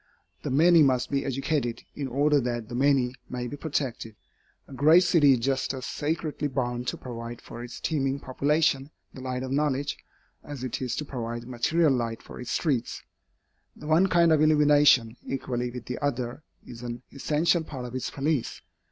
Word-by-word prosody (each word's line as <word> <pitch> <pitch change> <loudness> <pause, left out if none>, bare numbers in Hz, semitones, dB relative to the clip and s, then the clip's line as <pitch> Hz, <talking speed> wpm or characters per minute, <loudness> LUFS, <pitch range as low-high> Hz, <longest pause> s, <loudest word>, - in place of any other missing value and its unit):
The - - -4
many 165 +5 +5
must 130 -3 +2
be 140 -1 +1
educated, 135 -2 -2
in 140 -2 -4
order 145 +3 +3
that 120 -2 -3
the - - -7
many 130 -1 +2 0.2
may 125 -1 -4
be 125 - -5
protected. 135 -7 -3 0.5
A - - -12
great 155 +7 +6
city 150 -6 +5
is 125 - +1
just 135 +2 0
as 130 -1 -6
sacredly 150 0 -2
bound 125 -2 -2
to - - -2
provide 120 -1 -7
for 120 - -9
its 120 - -8
teeming 140 -3 -1
population 140 +1 +1 0.2
the 130 - -9
light 130 0 -3
of 130 - -5
knowledge, 145 0 0 0.4
as 145 -4 -7
it 130 0 -3
is 125 -2 -2
to 150 - -3
provide 120 -3 -5
material 140 +5 +2
light 115 -3 -2
for - - -10
its 125 - -7
streets. 130 -4 -1 0.7
The - - -12
one 160 +5 +4
kind 170 -3 +4
of 155 - +3
illumination, 145 -6 +5
equally 125 -2 -3
with 120 -1 -8
the 125 - -5
other, 130 -2 -2 0.2
is 115 -1 -10
an 120 0 -6
essential 160 +4 +1
part 130 -5 -7
of 120 - -8
its 130 - -3
police. 145 -2 -1
135 Hz, 180 wpm, -27 LUFS, 125-150 Hz, 0.7 s, great